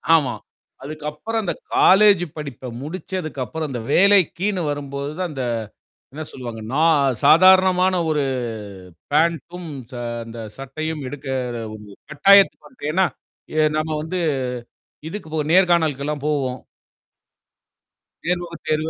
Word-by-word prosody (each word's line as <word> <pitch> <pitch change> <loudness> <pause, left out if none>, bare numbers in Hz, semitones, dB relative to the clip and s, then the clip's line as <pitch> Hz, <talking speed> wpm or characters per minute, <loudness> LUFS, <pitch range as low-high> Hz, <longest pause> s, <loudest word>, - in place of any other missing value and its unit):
ஆமா. 140 -6 +1 0.5
அதுக்கப்புறம் 155 +10 -4
அந்த 180 - -1 0.2
காலேஜ்ஜு 195 -2 +6
படிப்ப 135 -4 -6
முடிச்சதுக்கப்புறம், 155 -3 -4
அந்த 125 -3 -4
வேலைக்கின்னு 195 0 +3
வரும்போது 140 0 -4
தான், 180 -2 -1
அந்த 135 -3 -4 0.7
என்ன 155 +1 -5
சொல்லுவாங்க? 120 -4 -7
நா 155 - +2 0.4
சாதாரணமான 185 +1 +6
ஒரு 150 -2 +1 0.9
பேண்டும், 170 +2 0 0.2
ச - - -13 0.3
அந்த 115 0 -10 0.2
சட்டையும் 155 +3 -5
எடுக்கற 130 -4 -4 0.2
ஒரு 105 -1 -10 0.3
கட்டாயத்துக்கு 195 +6 +5
வந்துட்டேன் 155 - -5
ஏன்னா? 190 -1 +4 0.5
ஏ - - +5 0.2
நம்ம 155 0 -1
வந்து. 180 +3 -3 0.9
இதுக்கு 205 -2 -7
போ 160 - -1 0.2
நேர்காணலுக்கெல்லாம் 155 -6 +2
போவோம். 130 -4 -1 1.6
நேர்முக 175 -1 -2
தேர்வு, 155 +1 0
155 Hz, 110 wpm, -21 LUFS, 140-180 Hz, 1.6 s, காலேஜ்ஜு